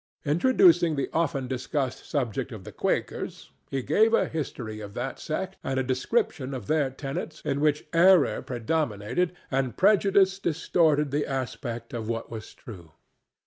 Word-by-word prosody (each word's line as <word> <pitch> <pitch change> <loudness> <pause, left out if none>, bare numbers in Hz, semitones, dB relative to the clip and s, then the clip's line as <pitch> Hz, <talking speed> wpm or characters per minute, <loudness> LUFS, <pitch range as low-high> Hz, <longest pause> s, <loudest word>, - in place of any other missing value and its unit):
Introducing 170 - +4
the 140 - -2
often 145 -5 0
discussed 130 +1 -3
subject 130 -2 -2
of 110 -5 -8
the - - -9
Quakers, - - -3 0.2
he 135 -2 -2
gave 225 - +4
a - - +2
history 120 -8 -5
of 105 -1 -9
that 130 +2 -4
sect 190 +5 -4
and 130 0 -1
a - - +1
description 135 - -1
of 120 -6 -6
their 150 0 +1
tenets 135 +3 -5
in 140 - 0
which 150 -1 +2
error 175 -1 +5
predominated 125 - -1 0.2
and 130 -2 -1
prejudice 195 -1 +4
distorted 155 -3 +2
the 145 +1 0
aspect 130 -3 -4
of 115 -2 -4
what 115 -1 -3
was 110 -2 -8
true. 85 -9 -12
140 Hz, 150 wpm, -27 LUFS, 125-165 Hz, 0.2 s, error